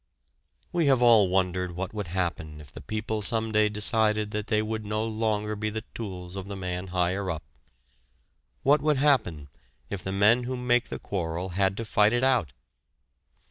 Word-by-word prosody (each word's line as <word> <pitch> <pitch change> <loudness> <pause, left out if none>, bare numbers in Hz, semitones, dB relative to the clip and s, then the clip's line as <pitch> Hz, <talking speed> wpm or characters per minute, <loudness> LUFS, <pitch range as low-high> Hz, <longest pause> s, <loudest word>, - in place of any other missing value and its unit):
We 170 -4 +1
have 130 -3 +4
all 110 -5 +6
wondered 90 -1 0
what 95 +2 -4
would 105 -4 -4
happen 85 -4 -3
if 75 -2 -13
the - - -10
people 110 0 -3
some 110 +1 0
day 105 -1 +3
decided 105 0 +2
that 105 0 -3
they 110 - +2
would 110 0 -3
no 105 +1 -2
longer 110 -1 -1
be 105 +1 -2
the 110 0 -5
tools 90 -5 -7
of 95 0 -6
the 100 - -5
man 90 0 -4
higher 90 +2 -1
up, 80 -3 -4 1.2
what 145 +1 +4
would 150 -1 +2
happen 110 - +1 0.4
if 95 -3 -4
the 95 - -3
men 105 +5 +4
who 130 +1 -3
make 125 0 +1
the - - -4
quarrel 90 -1 -3
had 95 +2 0
to 115 - -4
fight 105 +1 +3
it 120 +1 +1
out. 125 - +2
105 Hz, 180 wpm, -27 LUFS, 90-110 Hz, 1.2 s, all